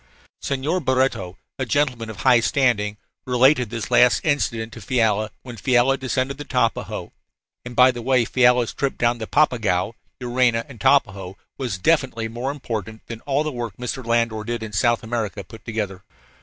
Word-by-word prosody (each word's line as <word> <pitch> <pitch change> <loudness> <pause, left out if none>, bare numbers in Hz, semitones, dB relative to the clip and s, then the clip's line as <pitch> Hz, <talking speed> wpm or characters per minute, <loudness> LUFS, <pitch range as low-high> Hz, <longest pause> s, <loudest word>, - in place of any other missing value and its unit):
Senhor 140 +6 -1
Barreto, 130 - 0 0.2
a 130 - 0
gentleman 125 -4 0
of 110 - -8
high 130 -3 +5
standing, 115 -5 +1 0.3
related 125 -1 +4
this 115 -3 -5
last 125 0 +5
incident 115 -7 0
to - - -10
Fiala 110 -4 +1
when 120 -3 -9
Fiala 125 +3 +3
descended 130 +1 -2
the - - -4
Tapajos 125 -6 -1 0.5
(and, 120 0 -8
by 125 +1 +7
the 120 -1 -7
way, 125 0 +2
Fiala's 125 -1 +3
trip 140 -1 -2
down 120 0 +1
the 110 - -5
Papagaio, 110 -9 +1 0.3
Juruena, 120 -2 +1
and 130 -5 -13
Tapajos 100 -6 +2 0.2
was 120 -9 -3
infinitely 135 -8 +2
more 120 +4 -4
important 110 -6 -5
than 115 -1 -8
all 140 +2 +1
the 155 - -3
work 120 -5 -5
Mr. 125 +2 -4
Landor 115 -2 0
did 120 0 -4
in 110 -1 -7
South 120 +3 +2
America 110 -3 -3
put 110 +4 -14
together). 105 -4 -4
120 Hz, 170 wpm, -22 LUFS, 110-130 Hz, 0.5 s, by